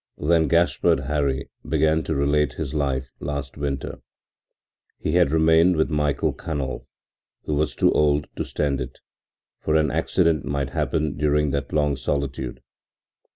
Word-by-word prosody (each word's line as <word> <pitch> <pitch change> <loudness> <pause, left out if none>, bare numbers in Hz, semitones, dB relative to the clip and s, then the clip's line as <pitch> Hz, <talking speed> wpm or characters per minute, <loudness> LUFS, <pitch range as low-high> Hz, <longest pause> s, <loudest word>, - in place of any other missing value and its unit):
Then 80 +1 +2
Gaspard 85 +1 +2
Hari 70 -3 -1
began 80 0 +2
to 80 - -1
relate 70 -1 +1
his 65 - -5
life 65 -3 -1
last 70 -1 -4
winter. 70 -2 -4 1.0
He - - -2
had 85 -2 +4
remained 80 +3 +4
with 80 +1 +1
Michael 75 -2 0
Canol, 70 -5 -4 0.6
who 75 - -3
was 75 +1 0
too - - +3
old 75 -1 +3
now - - -22
to - - -2
stand 70 -3 -1
it, 65 0 -6 0.6
for 80 - 0
an 75 -2 +3
accident 80 -1 +1
might 70 0 -2
happen 75 -2 -1
during 75 -1 +2
that 70 0 -3
long 75 -1 +1
solitude. 65 -1 -3
75 Hz, 150 wpm, -23 LUFS, 70-80 Hz, 1.0 s, had